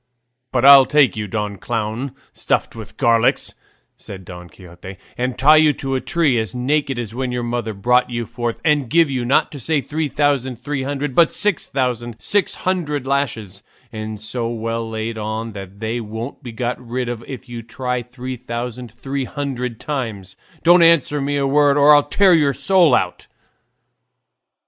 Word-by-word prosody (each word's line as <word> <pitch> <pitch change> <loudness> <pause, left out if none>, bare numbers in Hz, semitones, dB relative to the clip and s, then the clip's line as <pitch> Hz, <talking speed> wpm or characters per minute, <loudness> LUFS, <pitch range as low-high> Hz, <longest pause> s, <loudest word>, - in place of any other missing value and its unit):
"But 130 0 +1
I'll 140 -1 +10
take 145 -4 +3
you, 105 -1 -4
Don 105 -1 -3
Clown 115 +4 -3 0.2
stuffed - - -1
with 110 -2 -10
garlic," 115 -1 +3 0.6
said 95 -2 -10
Don 90 -1 -10
Quixote, 90 +2 -12 0.2
"and 125 0 -2
tie 150 +3 +6
you 155 -1 +5
to 135 -1 -4
a 130 - 0
tree 160 -9 +1
as 110 -2 -4
naked 135 +1 0
as 115 -3 -5
when 130 +1 -3
your 125 0 -2
mother 120 -1 -2
brought 125 +5 +2
you 120 -1 -3
forth, 120 +1 -4
and 150 -6 +2
give 165 -1 +3
you, 130 -2 -1
not 125 +3 +2
to 145 - -8
say 155 +4 0
three 155 +3 -3
thousand 140 -3 0
three 135 +4 -4
hundred, 140 +1 -3
but 165 +4 +4
six 210 -4 -1
thousand 120 -4 -2
six 200 - 0
hundred 155 -7 -1
lashes, 115 -8 -2 0.3
and 110 -1 -6
so 115 +2 -4
well 115 0 -3
laid 110 0 -4
on 110 +2 -4
that 100 -1 -10
they 110 +2 -2
won't 110 +6 -7
be 125 -4 -8
got 120 +2 -4
rid 125 +1 -3
of 120 -1 -5
if 130 -1 -8
you 120 -1 -7
try 125 +2 -3
three 125 +2 -7
thousand 120 -1 -6
three 135 +3 -4
hundred 125 -5 -4
times; 110 -10 -5 0.3
don't 175 +1 +6
answer 165 -3 +4
me 145 +1 -1
a 140 - 0
word 145 +1 +3
or 145 +1 +7
I'll 145 - +7
tear 190 +5 +3
your 145 -4 +3
soul 180 +1 +3
out." 90 - -2
125 Hz, 180 wpm, -20 LUFS, 115-140 Hz, 0.6 s, I'll